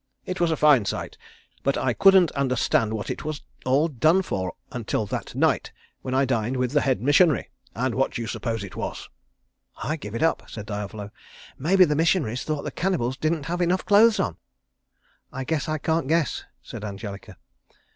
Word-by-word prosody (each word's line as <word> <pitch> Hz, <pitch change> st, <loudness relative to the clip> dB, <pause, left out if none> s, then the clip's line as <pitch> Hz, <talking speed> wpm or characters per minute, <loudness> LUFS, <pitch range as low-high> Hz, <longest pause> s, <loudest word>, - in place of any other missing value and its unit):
It 185 Hz, +1 st, -4 dB
was 170 Hz, -, +3 dB
a 160 Hz, -, 0 dB
fine 145 Hz, -8 st, +5 dB
sight, -, -, -4 dB, 0.5 s
but 140 Hz, -, 0 dB
I 130 Hz, -2 st, +1 dB
couldn't 190 Hz, 0 st, +6 dB
understand 130 Hz, -5 st, +1 dB
what 105 Hz, -, -4 dB
it -, -, -5 dB
was 155 Hz, -1 st, -5 dB, 0.2 s
all 140 Hz, +5 st, +3 dB
done 160 Hz, +6 st, +3 dB
for 95 Hz, -, -3 dB, 0.2 s
until 115 Hz, -3 st, -2 dB
that -, -, -5 dB
night, -, -, +1 dB, 0.3 s
when 130 Hz, 0 st, -3 dB
I 135 Hz, +1 st, +3 dB
dined 120 Hz, 0 st, -1 dB
with 125 Hz, -1 st, 0 dB
the 145 Hz, 0 st, +3 dB
head 130 Hz, -3 st, 0 dB
missionary 145 Hz, +3 st, +3 dB, 0.2 s
and 125 Hz, +1 st, -1 dB
what 135 Hz, +2 st, 0 dB
do -, -, -3 dB
you -, -, -5 dB
suppose 115 Hz, -1 st, -3 dB
it 100 Hz, -, -9 dB
was?" -, -, -5 dB, 0.7 s
"I 155 Hz, -, -1 dB
give 105 Hz, -7 st, -7 dB
it 115 Hz, -, -1 dB
up," 165 Hz, -, 0 dB
said 110 Hz, -2 st, -7 dB
Diavolo, 105 Hz, 0 st, -5 dB, 0.5 s
"maybe 185 Hz, +6 st, +5 dB
the 150 Hz, -2 st, 0 dB
missionaries 155 Hz, -, +1 dB
thought 150 Hz, -2 st, -3 dB
the -, -, -4 dB
cannibals 135 Hz, -10 st, -1 dB
didn't 155 Hz, +1 st, -1 dB
have 175 Hz, +2 st, -2 dB
enough 175 Hz, +2 st, +1 dB
clothes 215 Hz, +2 st, +5 dB
on." 85 Hz, -, -1 dB, 0.9 s
"I 130 Hz, -, -4 dB
guess 155 Hz, +3 st, -2 dB
I 155 Hz, -, 0 dB
can't 160 Hz, -1 st, 0 dB
guess," 165 Hz, 0 st, 0 dB, 0.2 s
said -, -, -8 dB
Angelica. 100 Hz, -1 st, -7 dB
135 Hz, 185 wpm, -25 LUFS, 115-165 Hz, 0.9 s, couldn't